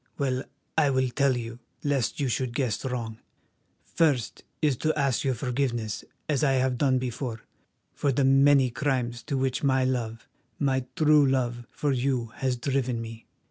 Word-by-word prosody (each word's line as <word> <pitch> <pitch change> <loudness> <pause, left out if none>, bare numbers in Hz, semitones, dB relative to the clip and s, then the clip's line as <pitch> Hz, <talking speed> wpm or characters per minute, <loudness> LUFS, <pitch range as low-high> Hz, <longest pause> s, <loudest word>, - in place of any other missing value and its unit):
Well, 130 -2 0 0.4
I 145 -3 +4
will 130 -1 +1
tell 135 +1 +2
you, 115 0 -6 0.2
lest 140 -5 0
you 140 - +1
should 125 0 -1
guess 125 -7 -1
wrong. 115 -4 -4 0.7
First, 145 -9 0 0.2
it - - +1
is 130 - -1
to 155 +3 0
ask 140 -3 +1
your 130 -2 +1
forgiveness 120 -3 -2 0.2
as 150 -1 +1
I 135 -2 +4
have 130 -1 +1
done 135 -3 +3
before, 125 -2 -4 0.5
for 140 - 0
the 135 +2 +1
many 135 -1 +5
crimes 120 -3 -1
to 140 +3 -3
which 130 -1 0
my 130 -2 +2
love, 115 -3 -2 0.3
my 130 -2 0
true 150 -1 +5
love, 120 -3 -1
for 145 - -1
you 125 -3 0
has 130 -2 0
driven 130 -2 -1
me. 115 0 -8
130 Hz, 170 wpm, -27 LUFS, 120-140 Hz, 0.7 s, many